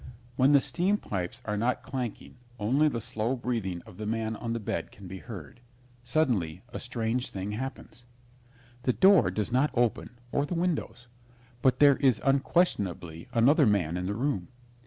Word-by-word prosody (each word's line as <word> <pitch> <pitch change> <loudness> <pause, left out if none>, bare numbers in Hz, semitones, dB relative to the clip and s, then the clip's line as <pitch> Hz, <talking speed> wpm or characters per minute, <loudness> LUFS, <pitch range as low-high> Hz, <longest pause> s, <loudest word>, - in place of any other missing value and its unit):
When 130 +2 +4
the 140 - +7
steam 190 +8 +1
pipes 90 - -5
are 105 -1 -1
not 120 +4 0
clanking 125 -1 -5 0.2
only 130 +8 +3
the 125 -6 -1
slow 115 +1 -2
breathing 110 -8 -3
of 90 - -14
the 105 - -5
man 110 0 -1
on 115 +1 -4
the 115 - -2
bed 105 - -3
can 100 -2 -12
be 95 +1 -7
heard. 95 - -9 0.4
Suddenly 120 - 0
a - - -6
strange 120 0 -2
thing 95 +1 -4
happens. 120 0 -6 0.8
The 125 - +1
door 190 - +6
does 105 +5 -2
not 130 +4 +3
open 120 0 0
or 140 +1 0
the 175 - -3
windows, 170 -7 -2 0.6
but 130 - +3
there 145 -2 +6
is 130 -6 +3
unquestionably 100 - +1
another 135 +5 +5
man 90 -6 +1
in 90 0 -2
the 100 - -2
room. 120 -7 -1
120 Hz, 170 wpm, -28 LUFS, 105-135 Hz, 0.8 s, the